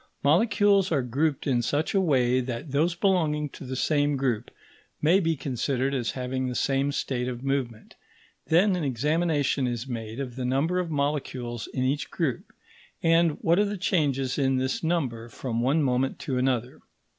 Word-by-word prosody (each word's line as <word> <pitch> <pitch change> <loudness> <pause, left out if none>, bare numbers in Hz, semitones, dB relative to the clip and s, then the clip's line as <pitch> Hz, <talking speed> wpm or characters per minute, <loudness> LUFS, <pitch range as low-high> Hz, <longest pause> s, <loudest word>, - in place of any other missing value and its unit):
Molecules 195 +4 +3
are 140 -5 +2
grouped 140 +4 -1
in 125 -4 +2
such 145 +6 -1
a 195 - +3
way 130 -7 +2
that 125 +3 -5
those 160 +5 +1
belonging 160 -6 +1
to - - -11
the 130 +1 -4
same 145 +1 +1
group 125 -4 -1 0.5
may 170 +6 +4
be 165 -3 +1
considered 135 0 -1
as 125 -4 -1
having 130 0 -2
the 125 - -3
same 135 +2 +1
state 125 -3 -2
of 125 0 -5
movement; 135 -5 -3 0.5
then 185 +4 +4
an 175 - -2
examination 145 +1 +1
is 120 0 -3
made 115 -1 -5
of 130 -3 -5
the 130 - -3
number 140 +8 +1
of 180 -2 -2
molecules 140 -5 -2
in 130 - -1
each 140 +3 -1
group, 145 -9 -2 0.5
and 165 -1 +4
what 170 +3 +4
are 210 - +4
the 205 0 -3
changes 145 -8 0
in 135 -1 +2
this 130 +4 -1
number 130 -9 -1
from 115 -1 -3
one 140 +6 +2
moment 130 0 0
to 135 - -3
another. 125 -1 -1
135 Hz, 175 wpm, -26 LUFS, 125-160 Hz, 0.5 s, may